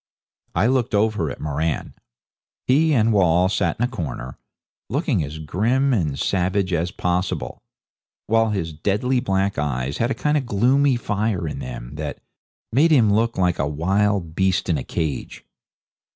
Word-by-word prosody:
I - - +3
looked 125 -2 +1
over 105 -6 +1
at - - -7
Moran. 75 +1 -2 0.7
He 155 +5 +3
and 115 -5 +3
Wall 90 -2 +3
sat 95 -4 0
in 120 - +2
a - - 0
corner, 65 - -6 0.5
looking - - 0
as 75 +2 -6
grim 115 - +1
and 80 - 0
savage 95 +2 0
as 85 +1 0
possible, 90 0 -2 0.6
while 115 0 +2
his 90 -6 -2
deadly 105 +11 0
black 100 - 0
eyes 70 -1 -2
had 120 - +1
a - - -1
kind 150 0 +1
of 130 - -7
gloomy 130 +6 +3
fire 105 -6 -1
in 75 - -5
them 60 0 -7
that 75 -1 -4 0.5
made 145 +8 +4
him 115 -10 +4
look 115 +2 +1
like 90 -2 +1
a 70 - +1
wild 95 +3 0
beast 95 +1 +1
in 80 -4 +2
a - - -5
cage. 80 -5 -4
95 Hz, 160 wpm, -22 LUFS, 80-115 Hz, 0.7 s, made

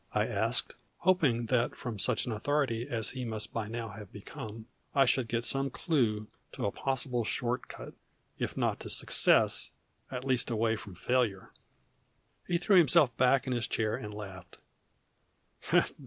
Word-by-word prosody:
I - - +3
asked, - - +1 0.3
hoping 145 -11 +2
that 120 0 +1
from 115 -5 -6
such 115 +2 +3
an 125 - -3
authority 120 +1 -1
as 115 -3 0
he 130 -1 -5
must 110 -3 -3
by 110 -2 -2
now 115 0 -5
have 105 -3 -10
become 110 +2 -9 0.3
I 135 -1 +6
should 130 -3 +2
get 115 +1 -2
some 135 0 -1
clue 115 - 0 0.3
to - - -3
a 100 - 0
possible 125 -1 -1
short 120 +3 -1
cut, - - -9 0.5
if - - -3
not - - 0
to - - -8
success, - - +3 0.4
at 125 0 -5
least 130 -2 +2
away 115 -1 +1
from 100 -4 -9
failure. 110 -1 0 1.0
He 175 - +1
threw 190 +3 +4
himself 155 -6 +5
back 130 +1 +3
in 130 - -1
his 120 -2 0
chair 110 -1 0
and 105 - -6
laughed. 95 -4 -9
120 Hz, 160 wpm, -31 LUFS, 110-130 Hz, 1.0 s, I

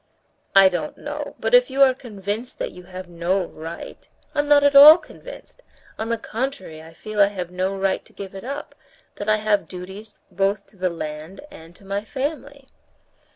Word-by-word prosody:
"I 195 -1 +9
don't 175 -5 -3
know; 295 0 -6
but - - -2
if - - +6
you 275 +1 +4
are 260 -1 +5
convinced 220 -1 -6
that - - -4
you 180 0 -13
have 185 0 -9
no 175 +2 -1
right...." 165 0 -9 0.2
"I'm 290 -1 0
not 290 -1 +5
at 285 0 +3
all 300 +3 +11
convinced. - - -13 0.4
On 220 +1 -3
the 230 - 0
contrary, 230 - -5
I 160 +1 -13
feel 210 +5 -3
I 200 - +7
have 180 -3 -6
no 185 +2 -2
right 195 0 0
to - - -19
give 195 -1 -9
it 195 - -9
up, 280 +4 -6 0.4
that 205 - -4
I 215 - +5
have 210 -1 0
duties 190 +4 -9 0.2
both 195 +2 0
to - - -23
the 185 -1 -1
land 160 - -7
and 165 +2 -14
to 200 - -19
my 200 +1 -3
family." 280 +2 -5
200 Hz, 195 wpm, -22 LUFS, 185-265 Hz, 0.4 s, all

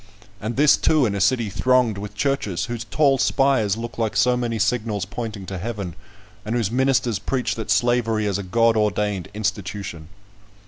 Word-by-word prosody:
And 110 +3 -4
this, 145 +1 +5
too, 155 -4 +3
in 105 - 0
a 100 - -2
city 115 0 +2
thronged 115 +1 +2
with 105 0 -7
churches, 105 -7 -1
whose 115 -1 -5
tall 140 +1 +2
spires 110 0 +2
look 120 +1 -6
like 110 -2 -1
so 125 +4 +4
many 120 -2 -2
signals 105 -1 0
pointing 110 -1 -6
to 95 -1 -5
heaven, 100 -3 -4 0.5
and 110 +3 -3
whose 115 -4 0
ministers 125 -4 +1
preach 125 +4 -1
that 110 - -6
slavery 115 -3 +2
is 100 -1 -1
a - - -2
God 115 +4 +2
ordained 105 -3 0
institution! 100 -6 -4
110 Hz, 175 wpm, -22 LUFS, 100-120 Hz, 0.5 s, this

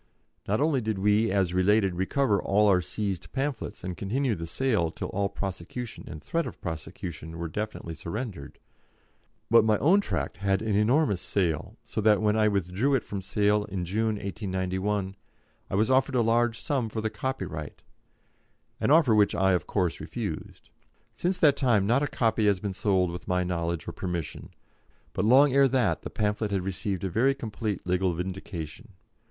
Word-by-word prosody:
Not 105 +3 +1
only 145 -3 +2
did 110 -2 -2
we, 105 +3 +3
as 95 -2 +1
related, 95 +1 +3
recover 100 +4 +1
all 105 +2 +3
our 95 -3 +4
seized 95 +3 -4
pamphlets, 135 -7 -3
and 90 -1 -4
continue 120 +7 -1
the 85 -4 -5
sale 110 -4 +1
till - - -6
all 100 +1 -1
prosecution 100 +6 -6
and 75 -2 -8
threat 170 0 -1
of - - -9
prosecution 80 0 -6
were 85 0 -3
definitely 105 -2 -5
surrendered; 85 - -6 0.9
but 115 -1 +7
my 110 -1 +3
own 180 - +4
tract - - -3
had 95 +1 0
an 110 -2 0
enormous 105 - +2
sale, 85 -6 -1
so - - -3
that 105 -1 +4
when 105 0 +2
I 110 -1 +3
withdrew 100 +7 +1
it 130 - -1
from 100 -1 -5
sale 105 +1 +1
in 95 -4 -4
June, 110 +4 0
1891, 95 -1 -2 0.5
I - - -2
was 110 +5 +2
offered 130 +1 +3
a 120 - +4
large 115 0 +2
sum 130 -6 -1
for 110 - -4
the 110 0 -2
copyright, 95 - -5 1.0
an - - +1
offer 150 -6 +5
which 105 -1 +4
I, 95 +2 +3
of 90 - 0
course, 90 -5 0
refused. - - -6 0.4
Since 180 +1 -1
that 145 -3 +6
time 115 -7 +3
not 120 +6 +3
a 145 - +1
copy 110 -4 +1
has 100 -3 +3
been 100 0 -3
sold 95 -3 +1
with 90 - -8
my 90 0 +1
knowledge 85 -2 -2
or - - -3
permission, 85 -4 -5 0.6
but - - 0
long 130 +4 +6
ere 140 0 +6
that 125 -4 +1
the - - -6
pamphlet 105 0 -1
had 100 -2 -1
received 95 0 -3
a - - 0
very 130 +8 +3
complete 110 -5 -4
legal 90 0 +1
vindication. 95 - -6
105 Hz, 180 wpm, -27 LUFS, 90-115 Hz, 1.0 s, but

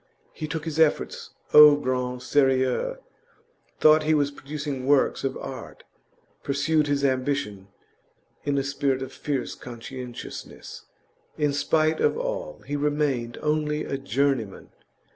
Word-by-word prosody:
He 155 - -5
took 155 +1 -4
his 160 -1 -3
efforts 160 -2 +1 0.2
au 150 -1 +10
grand 125 -3 -2
serieux; 135 - +2 0.8
thought 155 0 +6
he 155 +1 +2
was 145 -1 +1
producing 140 -2 -5
works 140 -1 +3
of 135 -1 -2
art; 130 -3 -8 0.6
pursued 150 +2 +1
his 140 -1 +1
ambition 130 -7 -1 0.8
in 145 -1 0
a 135 - +1
spirit 135 -1 -1
of 130 - -8
fierce 140 -4 -3
conscientiousness. 125 +1 -9 0.5
In 150 -2 +1
spite 155 +2 +1
of - - +2
all, - - -4
he 145 - -3
remained 145 -5 -1
only 150 0 0
a - - -3
journeyman. 135 -6 -1
140 Hz, 125 wpm, -25 LUFS, 130-150 Hz, 0.8 s, au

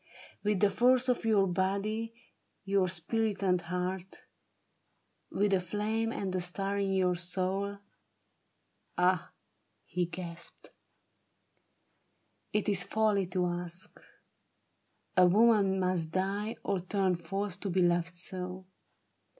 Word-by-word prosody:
— - - -22
With 210 -2 +1
the 205 -1 +5
force 250 +4 +4
of 245 -2 +1
your 210 -3 +4
body, 200 +5 -1 0.5
your 195 -2 +2
spirit, 205 +5 -1
and 180 -2 +2
heart? 180 +2 -4 1.1
With 200 0 +1
a 190 - +4
flame 215 +5 -1
and 190 -5 -3
a 185 - 0
star 195 +3 -2
in 195 -1 0
your 185 -1 +3
soul? 185 +3 -1 1.2
Ah! 180 -1 +2 0.3
" 105 -1 -46
he 175 - -1
gasped, 170 0 -8 0.9
" - - -45
It 210 - 0
is 200 -3 +2
folly 210 -1 +1
to 180 0 0
ask: 175 0 -5 1.2
a 180 -1 +7
woman 200 -1 +4
must 180 -3 0
die 195 +5 -1
Or 200 -2 0
turn 190 +1 +1
false 195 +3 -3
to 200 - -4
be 185 0 +2
loved 175 0 +1
so. 185 +1 -5
190 Hz, 125 wpm, -31 LUFS, 180-205 Hz, 1.2 s, a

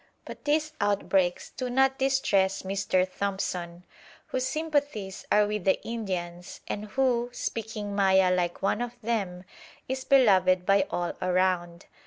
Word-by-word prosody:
But - - -10
these 305 +1 +1
outbreaks 195 -3 +1
do 255 -1 -4
not 265 +1 +2
distress 210 -8 +2
Mr. 190 -1 0
Thompson, 180 -3 -3 0.5
whose 255 0 -1
sympathies 285 -10 -2
are 210 0 +5
with 210 -2 -3
the 190 - +2
Indians, 180 -6 -5
and 210 - -4
who, 245 +1 +1
speaking 215 -3 -4
Maya 190 -2 +4
like 175 0 -1
one 210 +3 +1
of 245 0 -5
them, 195 -6 -2 0.4
is 260 0 -3
beloved 185 -9 +4
by 195 0 +3
all 175 -1 -2
around. 180 -1 0
200 Hz, 135 wpm, -27 LUFS, 185-245 Hz, 0.5 s, are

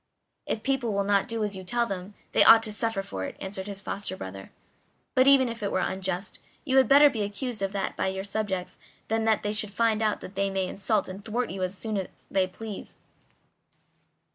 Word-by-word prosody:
"If 215 - -2
people 265 -5 0
will 200 0 +1
not 200 0 +2
do 230 -2 -2
as 205 -1 -2
you 190 - -7
tell 235 +6 0
them 195 -1 -6 0.2
they - - +6
ought 225 0 +9
to 215 - +1
suffer 225 -2 -1
for 95 - -5
it," - - -6
answered 190 0 -5
his 200 -1 -5
foster 195 -1 -5
brother; 95 - -8 0.6
"but 255 +1 +4
even 275 -2 +7
if 230 -1 -5
it 200 - -1
were - - +1
unjust, 190 +1 -2 0.3
you 265 -2 +2
had 265 - +6
better 285 +1 +8
be 240 -6 -1
accused 210 +3 -4
of 195 -1 -1
that 195 -1 -2
by - - 0
your 190 0 -2
subjects 195 -3 -3 0.3
than 225 0 +1
that 220 -1 +2
they 210 0 -1
should 210 -1 -1
find 220 +1 +1
out 215 -1 +1
that 185 - -9
they 195 0 0
may 190 -1 -1
insult 200 +1 0
and 190 +2 -8
thwart 240 +3 -2
you 190 0 -5
as 185 +1 -2
often 215 -2 -1
as 190 - -7
they 190 -1 +2
please." 210 +2 -8
205 Hz, 220 wpm, -27 LUFS, 190-225 Hz, 0.6 s, ought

